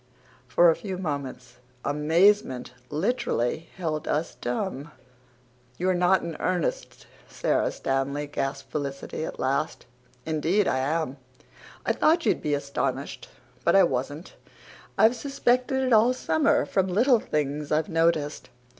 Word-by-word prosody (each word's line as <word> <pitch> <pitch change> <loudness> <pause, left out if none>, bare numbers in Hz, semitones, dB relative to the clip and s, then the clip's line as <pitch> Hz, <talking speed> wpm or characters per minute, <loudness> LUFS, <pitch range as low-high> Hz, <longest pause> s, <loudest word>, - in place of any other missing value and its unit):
For 170 +6 +5
a - - 0
few 190 -3 -5
moments 140 -7 -5 0.3
amazement 150 0 +2 0.2
literally 160 - -1
held 155 -4 -3
us 155 -1 -1
dumb. 135 +5 -4 0.9
"You're 185 +1 +1
not 180 +1 +3
in 165 - -5
earnest, 180 -3 -2 0.2
Sara - - 0
Stanley?" 135 +2 -2
gasped 135 -1 -4
Felicity 140 0 -4
at - - -7
last. 135 +1 -1 0.4
"Indeed 165 +6 +1
I 130 - +1
am. 145 0 -1 0.7
I - - +2
thought 335 +1 +2
you'd - - +2
be 150 -1 0
astonished. 140 -1 -3 0.3
But 170 - +3
I 195 - +7
wasn't. 145 +1 -2 0.6
I've 225 +3 +5
suspected 265 +1 0
it 255 -2 +2
all 225 +3 +5
summer, 160 - +2
from 190 +5 +1
little 235 +7 +4
things 150 -4 -2
I've 155 +1 +2
noticed. 165 -4 0
160 Hz, 130 wpm, -26 LUFS, 140-190 Hz, 0.9 s, I